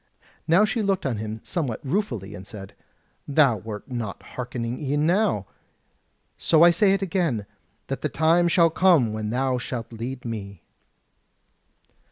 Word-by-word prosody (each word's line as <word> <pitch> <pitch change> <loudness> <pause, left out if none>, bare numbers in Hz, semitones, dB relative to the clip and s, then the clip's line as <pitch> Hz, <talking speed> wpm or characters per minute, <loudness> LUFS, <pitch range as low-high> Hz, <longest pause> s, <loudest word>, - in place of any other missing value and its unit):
Now 175 +6 +5
she 225 +2 -1
looked 195 -4 0
on 125 -5 -1
him 110 +1 -5
somewhat 140 -10 -2
ruefully, 125 - -2
and 95 -1 -9
said: 100 -3 -9 0.5
"Thou 140 -5 +4
wert 105 +4 -8
not 115 -5 -4
hearkening 120 -1 -4
e'en 145 +2 0
now; 180 - +2 0.9
so 165 0 +4
I 175 - +8
say 195 +3 +3
it 195 - -2
again, 165 - -1 0.4
that - - -4
the - - -1
time 165 +3 +3
shall 170 -1 +4
come 165 - +4
when 110 -1 -3
thou 130 +2 0
shalt 120 -1 -5
lead 120 +3 -6
me." 100 -5 -6
130 Hz, 150 wpm, -24 LUFS, 110-170 Hz, 0.9 s, I